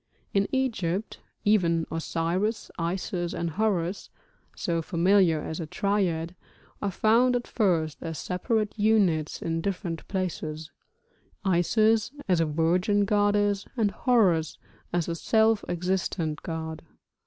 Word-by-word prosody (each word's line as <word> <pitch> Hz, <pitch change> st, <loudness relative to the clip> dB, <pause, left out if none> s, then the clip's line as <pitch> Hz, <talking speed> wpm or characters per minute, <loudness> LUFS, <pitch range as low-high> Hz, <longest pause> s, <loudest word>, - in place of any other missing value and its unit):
In 200 Hz, 0 st, +2 dB
Egypt 220 Hz, -7 st, -1 dB, 0.3 s
even 170 Hz, -6 st, +3 dB
Osiris, 170 Hz, +6 st, -1 dB
Isis, 175 Hz, 0 st, -2 dB
and 170 Hz, -1 st, -2 dB
Horus 195 Hz, -1 st, -1 dB, 0.5 s
(so 170 Hz, -1 st, -1 dB
familiar 175 Hz, 0 st, +3 dB
as 160 Hz, -, -5 dB
a 165 Hz, -, -4 dB
triad) 175 Hz, -3 st, 0 dB, 0.5 s
are 205 Hz, -, 0 dB
found 230 Hz, +6 st, +3 dB
at 240 Hz, -, -1 dB
first 165 Hz, -8 st, 0 dB
as 165 Hz, -1 st, -5 dB
separate 210 Hz, -, -1 dB
units 195 Hz, -8 st, +2 dB
in 165 Hz, 0 st, -1 dB
different 180 Hz, -3 st, -4 dB
places, 160 Hz, -5 st, -4 dB, 0.7 s
Isis 215 Hz, +5 st, +3 dB, 0.2 s
as 180 Hz, -3 st, +3 dB
a 165 Hz, -, +1 dB
virgin 180 Hz, +6 st, +2 dB
goddess, 205 Hz, -1 st, +2 dB
and 215 Hz, -3 st, +2 dB
Horus 185 Hz, -, +2 dB, 0.3 s
as 175 Hz, -2 st, 0 dB
a 170 Hz, -, -1 dB
self 220 Hz, +5 st, +2 dB
existent 175 Hz, -3 st, -1 dB
god. 160 Hz, -1 st, -5 dB
180 Hz, 120 wpm, -27 LUFS, 165-205 Hz, 0.7 s, even